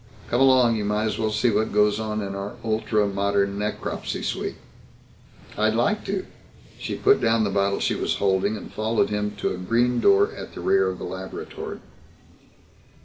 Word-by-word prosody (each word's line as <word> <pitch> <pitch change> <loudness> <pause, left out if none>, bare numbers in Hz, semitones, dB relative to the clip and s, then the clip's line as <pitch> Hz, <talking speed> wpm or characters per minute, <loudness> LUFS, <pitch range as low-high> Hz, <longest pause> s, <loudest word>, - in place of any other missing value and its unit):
Come 120 - +1
along. 130 -4 +5
You 105 - -2
might 105 +1 0
as 110 - -2
well 110 -1 +1
see 110 +3 +1
what 110 +1 0
goes 105 0 +3
on 110 -1 -2
in 100 0 -4
our 100 +3 -5
ultra 110 -1 +1
modern 100 0 0
necropsy 105 0 -3
suite." - - -3 1.0
"I'd 110 +1 +1
like 165 - +1
to." 195 -1 -2 0.5
She - - -4
put 410 +1 +3
down 115 -1 +3
the 100 - 0
bottle 100 0 +1
she - - +1
was - - -1
holding 100 +2 +1
and - - -10
followed 110 0 0
him 105 0 -2
to 105 - -1
a - - -5
green 120 +6 +1
door 405 +2 +4
at - - -9
the - - -7
rear 390 +2 +3
of - - -5
the - - -8
laboratory. 430 0 -7
110 Hz, 185 wpm, -24 LUFS, 100-120 Hz, 1.0 s, along